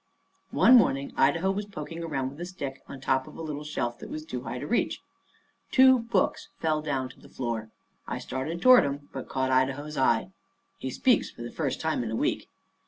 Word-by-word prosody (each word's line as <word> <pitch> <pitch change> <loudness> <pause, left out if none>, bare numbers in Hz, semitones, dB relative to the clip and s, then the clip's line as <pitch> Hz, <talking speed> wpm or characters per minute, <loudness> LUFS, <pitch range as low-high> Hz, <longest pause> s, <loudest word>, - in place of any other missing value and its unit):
One 250 +1 +7
morning 140 - +2
Idaho 165 +8 +3
was 205 +1 -3
poking 165 -3 -7
around 135 -5 -2
with 145 +4 -11
a - - -2
stick 140 -7 -6
on 140 - -8
top 130 0 0
of - - -12
a - - -6
little 150 -2 -4
shelf 120 -5 -3
that - - -9
was 155 0 -6
too 125 -5 -5
high 125 0 -5
to 125 - -5
reach. 240 - 0 0.7
Two 260 -1 +7
books 230 -5 0
fell 155 -1 0
down 135 -4 -1
to - - -16
the - - -16
floor. 115 -3 -4 0.4
I - - -3
started 160 +6 -4
toward 255 -1 +8
'em, 145 0 -4
but 135 - -6
caught 130 0 0
Idaho's 135 +3 0
eye. 130 +5 +2 0.5
He 130 - -3
speaks 250 - +2
for 120 - -10
the 120 - -6
first 145 -5 -2
time 160 -5 0
in 115 - -3
a 110 - -2
week. - - -1
145 Hz, 210 wpm, -28 LUFS, 130-170 Hz, 0.7 s, toward